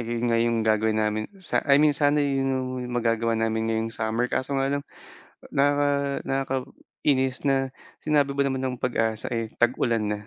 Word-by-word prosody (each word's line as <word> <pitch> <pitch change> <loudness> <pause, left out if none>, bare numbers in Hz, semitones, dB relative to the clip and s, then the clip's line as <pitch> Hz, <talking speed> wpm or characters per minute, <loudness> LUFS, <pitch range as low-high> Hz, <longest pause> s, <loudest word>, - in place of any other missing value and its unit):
ayon 120 0 -2
nga 115 -1 +2
yung 115 -1 +1
gagawin 110 0 +2
namin 105 0 -1
sa 185 - -1
I 140 - +7
mean, 150 0 +5
sana 145 0 +2
yun 135 -1 0
yung 130 -1 -1 0.3
magagawa 115 -1 +1
namin 110 0 0
ngayong 115 0 -1
summer, 110 +2 -1
kaso 130 +2 -2
nga 135 +1 +1
lang, 140 0 -1 0.7
naka 140 0 +1
nakaka-inis 130 0 -1
na, 135 -1 +1 0.3
sinabi 145 -2 +2
ba 140 - +2
naman 135 -1 -1
ng 130 -1 -2
PAG-ASA, 115 -2 -1
eh, 115 -1 -2
tag-ulan 120 -2 +1
na. 105 - -3
130 Hz, 170 wpm, -25 LUFS, 115-140 Hz, 0.7 s, I